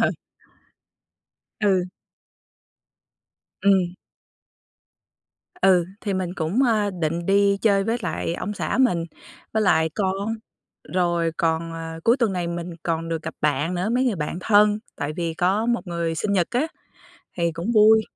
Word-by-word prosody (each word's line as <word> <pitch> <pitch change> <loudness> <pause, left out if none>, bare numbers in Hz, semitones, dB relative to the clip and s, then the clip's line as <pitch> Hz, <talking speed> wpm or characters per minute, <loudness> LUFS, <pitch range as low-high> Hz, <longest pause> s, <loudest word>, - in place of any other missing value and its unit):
Ờ. - - +3 1.5
Ừ. 195 -4 +3 1.8
Ừm. 190 -3 +3 1.7
Ừ, 185 -2 +5 0.2
thì 200 -2 -2
mình 185 -1 -2
cũng, 180 +9 0
ơ, 215 -5 +2
định 170 -1 -2
đi 200 0 +4
chơi 200 -3 +3
với 225 +3 0
lại 170 -2 -2
ông 205 - -4
xã 220 - -2
mình, 180 -11 +3 0.5
với 220 - +1
lại 160 -5 +3
con, 200 +2 -1 0.6
rồi 170 -2 +1
còn, 165 0 0
ờ, 165 0 -6
cuối 235 +2 +5
tuần 230 -7 +1
này 180 -2 -2
mình 170 +1 -4
còn 165 -1 -2
được 165 -1 -3
gặp 160 - -6
bạn 150 +4 0
nữa, 180 +4 -1
mấy 255 +1 +2
người 240 -6 +1
bạn 150 +2 -3
thân 210 +1 +4 0.2
tại 145 +1 -3
vì 170 -2 -2
có 190 +6 +1
một 235 -3 0
người 170 -1 -2
sinh 200 +6 -1
nhật 180 -4 +2
á 250 +6 +1 0.7
thì 170 -1 0
cũng 170 +8 -3
vui. 220 0 +6
185 Hz, 150 wpm, -23 LUFS, 165-210 Hz, 1.8 s, vui